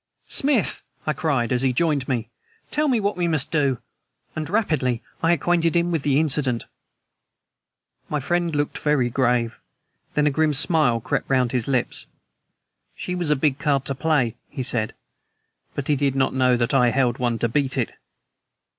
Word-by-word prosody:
"Smith!" 270 -7 +1 0.2
I 155 - +1
cried 140 -9 0
as 125 -1 +1
he 135 -1 +2
joined 145 -1 +1
me, 120 -3 -2 0.4
"tell 300 +1 +1
me 250 -5 +2
what 205 0 0
we 175 -1 0
must 155 -5 0
do!" 140 -5 +2 0.6
And 155 0 -4
rapidly 155 - 0 0.2
I 165 - +3
acquainted 170 -1 +2
him 170 0 +2
with 165 -3 0
the 140 0 +2
incident. 140 -6 +1 1.4
My 150 - -1
friend 170 +3 -1
looked 145 0 -1
very 140 -5 +1
grave; 120 -2 +1 0.6
then 150 - +3
a 150 - +3
grim 155 +1 +2
smile 135 -5 +2
crept - - -2
round 130 -3 +2
his 125 -3 -1
lips. 130 -3 0 0.9
"She 180 - -4
was 175 -3 -1
a 150 - +4
big 140 0 +1
card 140 -4 +1
to 140 - 0
play," 130 -4 +1
he 130 - -4
said; 115 -4 -1 0.8
"but 140 - -3
he 150 - +3
did 140 -1 0
not 135 -1 +1
know 130 -1 +3
that 120 +2 0
I 125 -3 +5
held 125 -1 +1
one 120 -2 0
to 120 - 0
beat 135 +2 0
it." - - 0
140 Hz, 175 wpm, -23 LUFS, 125-160 Hz, 1.4 s, I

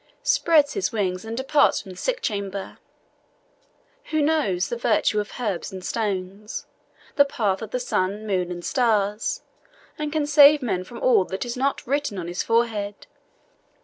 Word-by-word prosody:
] - - -41
spreads 300 -4 +3
his 400 - -1
wings 185 -5 -1
and 225 +1 -6
departs 275 +2 +3
from 190 - -10
the - - -10
sick - - -2
chamber; 200 -2 -4 1.3
who 310 - -1
knows 290 - +1
the - - -2
virtues 220 -2 +2
of 205 - -9
herbs 210 -5 -2
and 185 -1 -8
stones, 200 -1 -3 0.5
the 285 - +8
path 210 -9 -1
of 220 - -6
the 250 - -2
sun, 205 -3 -1
moon, 185 -4 -1
and 175 -1 -6
stars, 215 -6 0 0.6
and 300 -1 -2
can 310 -1 0
save 295 -1 +7
man 190 -6 -1
from 235 +6 -10
all 245 -7 +5
that 190 +5 -4
is 240 - -4
not 275 +2 -1
written 280 -5 -1
on 175 -2 -4
his 175 +1 -2
forehead. 220 -3 0
220 Hz, 170 wpm, -24 LUFS, 195-275 Hz, 1.3 s, the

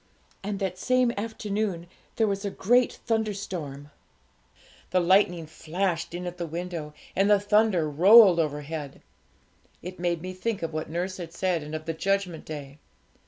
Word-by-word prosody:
And 200 0 -3
that 190 -2 -3
same 255 +2 +2
afternoon 205 -4 -3 0.3
there 225 - +3
was 200 -1 -1
a 200 - -1
great 240 +6 +2
thunderstorm; 195 -10 -3 1.0
the 185 - +2
lightning 175 -2 +3
flashed 170 +2 -3
in 180 +1 -5
at 175 0 -6
the 170 - -3
window, 165 -2 -5 0.2
and 195 +2 +3
the 205 -1 +6
thunder 205 -5 +3
rolled 185 +4 +7
overhead. 150 -1 -3 0.8
It 180 +1 -8
made 175 -1 -1
me 185 0 -5
think 200 +1 -3
of 165 -1 -3
what 155 0 -4
nurse 180 +3 -3
had 170 -2 -7
said, 180 -3 0
and 150 +1 -6
of 155 0 -6
the 165 - -2
Judgment 195 -1 -1
Day. 145 -2 -8
180 Hz, 160 wpm, -27 LUFS, 160-200 Hz, 1.0 s, rolled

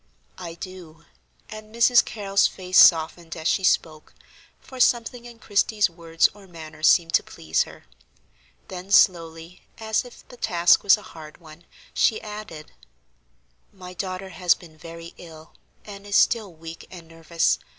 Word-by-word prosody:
"I 165 -1 -8
do," 170 -3 -11 0.4
and 215 +1 -11
Mrs. 240 +1 +5
Carrol's 200 -2 0
face 185 -1 0
softened 165 0 +4
as 160 0 -3
she 190 - 0
spoke, 155 -4 -1 0.4
for 260 - -13
something 240 0 +1
in 240 -1 -12
Christie's 210 -2 0
words 165 -1 +1
or 200 -1 -17
manner 160 -3 -12
seemed 165 +1 +3
to - - +4
please 80 0 -2
her. - - -16 0.8
Then 185 +1 -9
slowly, 165 -2 +2 0.2
as 220 -1 -1
if 245 - -16
the 245 - -15
task 175 -5 +3
was 200 +1 +5
a 210 - -14
hard 155 -2 -12
one, 165 0 -16 0.3
she 220 - +1
added: 210 -8 -10 1.0
"My 180 -2 -12
daughter 185 +1 -6
has 180 -2 +1
been 165 -4 -17
very 165 +2 -11
ill 160 -2 -14 0.3
and 200 -1 -11
is 200 - -3
still 210 -2 +2
weak 165 0 -11
and 170 -3 -12
nervous. 165 0 -1
180 Hz, 150 wpm, -23 LUFS, 165-205 Hz, 1.0 s, Mrs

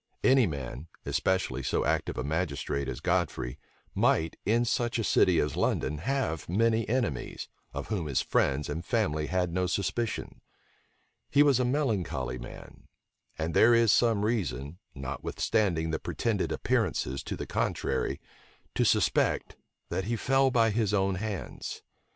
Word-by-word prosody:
Any 130 -3 +5
man, 70 0 -6 0.2
especially 90 -9 0
so 65 - 0
active - - 0
a 65 - -1
magistrate 70 -3 -2
as - - -5
Godfrey, - - -1 0.3
might, 80 0 +2
in 115 +3 +3
such 120 0 0
a 115 - 0
city 90 -3 +4
as 75 -1 0
London, 75 - 0
have 110 - -2
many 115 +4 +2
enemies, 115 - -2 0.2
of - - -6
whom 95 -8 -1
his 70 - +1
friends 70 +3 +1
and 80 +4 -4
family 75 -2 0
had 90 -1 0
no 90 +1 +1
suspicion. 100 +6 -2 0.9
He 145 +1 +5
was 140 -4 +4
a 125 - +2
melancholy 95 - -1
man; - - -11 0.5
and 80 +1 -2
there 120 +6 +6
is 115 -2 +5
some 115 -4 +3
reason, 85 - -2 0.2
notwithstanding 80 +5 -1
the 80 - -1
pretended - - -1
appearances 65 +1 0
to - - -5
the - - -4
contrary, 65 +1 -1 0.5
to - - +2
suspect - - +2 0.3
that 95 - -2
he 115 +2 -1
fell 135 +3 +3
by 115 -3 +3
his 105 -1 +1
own 95 -1 +2
hands. 100 0 -5
95 Hz, 145 wpm, -29 LUFS, 75-115 Hz, 0.9 s, there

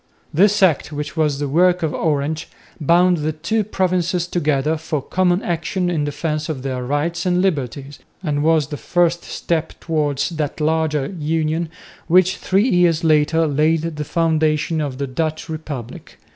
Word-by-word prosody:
This 200 +5 +4
Act, 160 -4 +2
which 150 +1 -5
was 150 -3 +1
the 145 0 -2
work 175 +4 +3
of 155 - 0
Orange, 155 +1 -1 0.3
bound 175 +3 +4
the 155 0 -1
two 170 +8 -1
provinces 185 -3 0
together 155 -3 0
for 160 -1 -3
common 180 +5 +1
action 175 +1 -1
in 155 -4 0
defence 150 +1 -3
of 135 -5 -4
their 130 -2 -3
rights 150 +6 -1
and 180 -1 +1
liberties 145 -6 -2 0.2
and 145 -4 -1
was 155 -2 +2
the 145 - -4
first 175 +1 +1
step 160 -1 -3
towards 150 -3 -1
that 155 -4 -3
larger 155 -2 +1
union, 160 +1 -1 0.4
which 185 +2 +4
three 195 +5 +1
years 175 -6 +3
later 160 +1 +3
laid 155 +2 +2
the 155 -3 -3
foundations 155 0 +1
of 140 -4 -3
the 140 - -2
Dutch 155 +5 -3
Republic. 150 -7 -7
160 Hz, 160 wpm, -20 LUFS, 150-175 Hz, 0.4 s, This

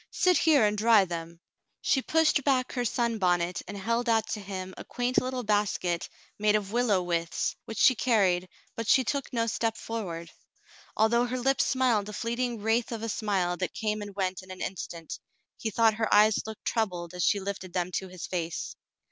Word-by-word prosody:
Sit 365 -1 +3
here 295 -8 +5
and 210 0 +1
dry 215 -1 +5
them." 170 -1 -6 0.4
She 265 - +1
pushed 315 -1 +2
back 260 -2 +1
her 245 - -1
sunbonnet 185 -8 0
and 205 - -6
held 230 +4 -1
out 225 -2 +3
to 215 - -2
him 190 -2 -6
a - - -8
quaint 245 +1 0
little 255 0 -3
basket 205 -5 0 0.3
made 210 0 +3
of 205 -2 -1
willow 225 -6 +2
withes, 170 -1 -1
which 225 - -7
she 260 - +6
carried, 190 -7 +2 0.3
but 230 -1 -4
she 260 - +5
took 280 +3 -2
no 230 -3 0
step 225 0 -1
forward. 175 -8 -5 0.7
Although 235 +3 +3
her 255 +1 -2
lips 270 +2 +2
smiled 240 -6 +1
a - - -7
fleeting 235 0 -2
wraith 225 +2 +1
of 225 -1 -4
a 230 - -2
smile 190 -5 0
that 185 -3 -3
came 215 -1 -1
and 205 -1 -8
went 190 -2 -2
in 185 - -16
an 185 0 -8
instant, 170 -3 -5 0.4
he 225 - -2
thought 225 +1 +3
her 220 0 -2
eyes 210 +1 +4
looked 220 -1 -9
troubled 180 -6 -1
as 180 -1 -2
she 200 - +3
lifted 190 -2 -5
them 180 0 -1
to 190 - -4
his 185 -2 -7
face. 170 -3 -4
215 Hz, 195 wpm, -28 LUFS, 185-235 Hz, 0.7 s, she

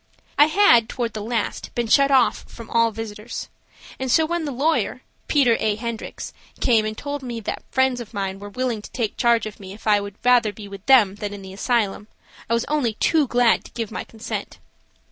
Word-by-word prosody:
I 295 - +6
had, 305 - +5
toward 235 -3 -3
the 215 - -5
last, 225 0 -3
been 240 - 0
shut 275 +4 +5
off 265 -3 +3
from 230 -1 -12
all 230 0 +4
visitors, 220 0 -7 0.5
and 260 -1 -2
so 320 +5 +4
when 340 0 -2
the 290 - -3
lawyer, 285 +6 0 0.2
Peter 255 -6 +3
A. 215 -1 +1
Hendricks, 230 0 -6 0.3
came 225 -3 +3
and 215 0 -4
told 285 0 -4
me 240 -3 -5
that - - -4
friends 260 -2 +1
of 225 - -10
mine 195 -2 -3
were 205 0 -8
willing 240 0 -2
to - - -11
take 225 -5 -3
charge 235 -2 +2
of 215 -1 -8
me 190 -1 -9
if 210 - -14
I 210 -2 +4
would 200 -1 -7
rather 245 -3 +5
be 205 0 -10
with 200 -1 -10
them 235 -8 +6
than 205 0 -5
in 200 - -10
the 190 0 -9
asylum, 210 -1 -1 0.4
I 230 - +3
was 235 - -1
only 270 -8 0
too 305 +4 +2
glad 240 -1 +3
to - - -13
give 230 -3 -4
my - - -4
consent. 225 0 -6
230 Hz, 215 wpm, -22 LUFS, 210-255 Hz, 0.5 s, I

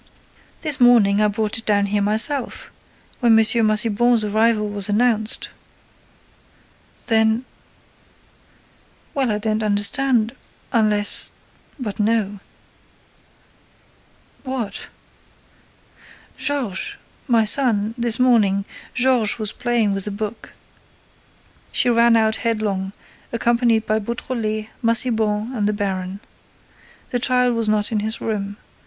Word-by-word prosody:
"This 300 -4 -1
morning, 220 -5 +5
I 210 - +4
brought 215 +2 -2
it 225 - -14
down 205 -1 +2
here 205 +1 -1
myself, 225 +7 -1 0.5
when 235 -3 +4
M. - - +6 0.3
Massiban's 220 +2 +2
arrival 215 +1 +1
was 205 -1 -2
announced." 220 0 0 1.6
"Then—?" 220 +1 +2 1.7
"Well, 270 -3 +1
I 210 - 0
don't 215 +1 -2
understand—unless—but 215 0 0
no." 210 -2 0 2.0
"What?" 255 -7 -4 1.5
"Georges—my 235 -2 -2
son—this 230 -1 +1
morning—Georges 235 +1 +1
was 215 -2 -4
playing 235 -4 0
with 195 -1 -4
the - - -3
book." 215 +2 -6 1.2
She 245 - +2
ran 235 0 +4
out 220 -1 +2
headlong, 210 -4 -2 0.4
accompanied 235 -1 +1
by 215 0 0
Beautrelet, 220 -1 -4
Massiban 230 -1 0
and 205 -3 0
the 210 - 0
baron. 195 -2 -4 0.9
The 245 - -1
child 250 -1 +2
was 230 -2 0
not 210 0 0
in 215 - 0
his 220 +2 -3
room. 205 -2 -4
220 Hz, 100 wpm, -20 LUFS, 210-240 Hz, 2.0 s, M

